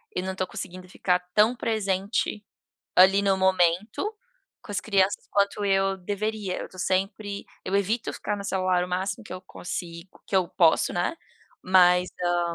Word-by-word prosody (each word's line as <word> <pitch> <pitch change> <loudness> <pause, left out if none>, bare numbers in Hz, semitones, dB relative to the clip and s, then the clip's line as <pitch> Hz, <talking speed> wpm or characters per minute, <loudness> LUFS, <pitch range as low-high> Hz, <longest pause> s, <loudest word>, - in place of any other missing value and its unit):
eu - - -1
não 190 - -2
estou 185 -1 -3
conseguindo 185 +1 -8
ficar 180 0 0
tão 215 +5 +4
presente 210 -1 -1 0.5
ali 195 +2 +7
no 195 -1 +2
momento 190 - +1 0.5
com 205 - -10
as 185 - -2
crianças 195 0 +1
quanto 200 +1 +1
eu 195 0 +2
deveria, 205 0 -3
eu - - -4
estou 185 - -13
sempre 200 +2 -2 0.2
eu 190 +1 -1
evito 210 +4 0
ficar 210 - -3
no 200 - -7
celular 185 -2 +1
o - - -4
máximo 190 +5 -2
que - - -13
eu 185 - -7
consigo 175 -1 -7
que - - -3
eu 185 -2 +3
posso 165 -2 +3
né, 175 - -1 0.5
mas, 180 -1 +5
hã, 175 0 +1
190 Hz, 165 wpm, -26 LUFS, 180-200 Hz, 0.5 s, ali